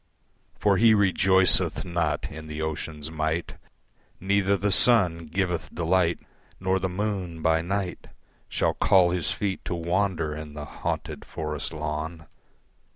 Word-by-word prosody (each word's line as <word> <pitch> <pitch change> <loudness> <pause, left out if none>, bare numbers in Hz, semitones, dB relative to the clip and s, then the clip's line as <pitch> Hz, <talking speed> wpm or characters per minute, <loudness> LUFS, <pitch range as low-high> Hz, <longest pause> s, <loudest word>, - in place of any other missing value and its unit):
For 100 -2 +3
he 110 +1 +6
rejoiceth 95 -2 +4
not 85 -4 -1
in 80 0 -9
the 75 0 -6
ocean's 80 0 -4
might, 80 +1 -2 0.6
Neither 100 +1 +2
the 100 +1 0
sun 90 -7 +3
giveth 85 -2 -2
delight, 85 0 +1 0.4
Nor 95 0 +1
the 95 0 -1
moon 90 -4 -3
by 80 0 +3
night 95 +1 -3 0.4
Shall - - +1
call 90 -2 +4
his 90 -2 -1
feet 95 -2 -2
to 90 - -2
wander 85 -2 -1
in 75 -1 -8
the 75 -1 -6
haunted - - -4
forest 75 -2 -4
lawn. 80 +1 -4
85 Hz, 135 wpm, -26 LUFS, 80-95 Hz, 0.6 s, he